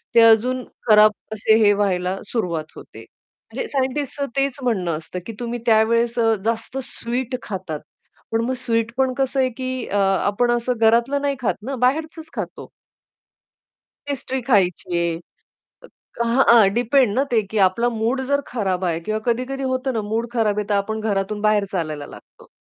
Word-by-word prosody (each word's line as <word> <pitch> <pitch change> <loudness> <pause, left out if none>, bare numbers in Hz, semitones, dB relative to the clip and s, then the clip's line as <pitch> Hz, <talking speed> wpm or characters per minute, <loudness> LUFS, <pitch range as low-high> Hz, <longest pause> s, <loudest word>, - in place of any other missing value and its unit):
ते 230 - +8
अजून 230 +3 +4 0.3
खराब 215 0 +7 0.2
असे 220 +1 +3
हे 205 - +6
व्हायला 190 -2 0
सुरुवात 170 -9 -2
होते. - - -12
म्हणजे 480 - -10
सायंटिस्टच 280 +1 -2
तेच 275 -1 0
म्हणणं 185 -10 0
असतं, 165 +3 -7
की 230 - -6
तुम्ही 240 0 -3
अ, - - -18
त्यावेळेस 230 +2 +3
अ, 225 -1 +4
जास्त 230 +3 -2
स्वीट 250 0 -4
खातात, 185 -6 -5 0.5
पण 225 - +1
मग 260 - -1
स्वीट 230 -2 -1
पण 265 -1 +2
कसं 270 0 0
आहे, 255 - +2
की 255 0 -4
अ, 205 - -1
आपण 200 +4 +2
असं 240 +1 0
घरातलं 235 +5 +3
नाही 280 -1 0
खात 235 - 0
ना, 275 - -2
बाहेरचच 315 +4 -1
खातो. - - -6 1.4
पेस्ट्री 265 -2 -2
खायची 185 -6 +2
आहे. 170 -1 0 1.0
अ, - - +4
हां, 240 +3 +3
हां. 230 -4 +7
डिपेंड 245 -1 +3
ना 260 - +2
ते, 230 -2 +3
की 220 - -1
आपला 235 +6 -1
मूड 230 +3 -1
जर 280 0 +3
खराब 190 -6 -2
आहे 165 -2 -1
किंवा 215 +6 -2
कधी-कधी 255 +3 -1
होतं 260 0 -1
ना, 225 - -1
मूड 220 +3 -2
खराब 215 -4 +1
आहे, 210 - 0
तर 205 - +1
आपण 220 +2 -1
घरातून 205 -1 -1
बाहेर 215 -1 +3
चालायला 155 -5 -3
लागतो, - - -15
230 Hz, 175 wpm, -21 LUFS, 205-255 Hz, 1.4 s, ते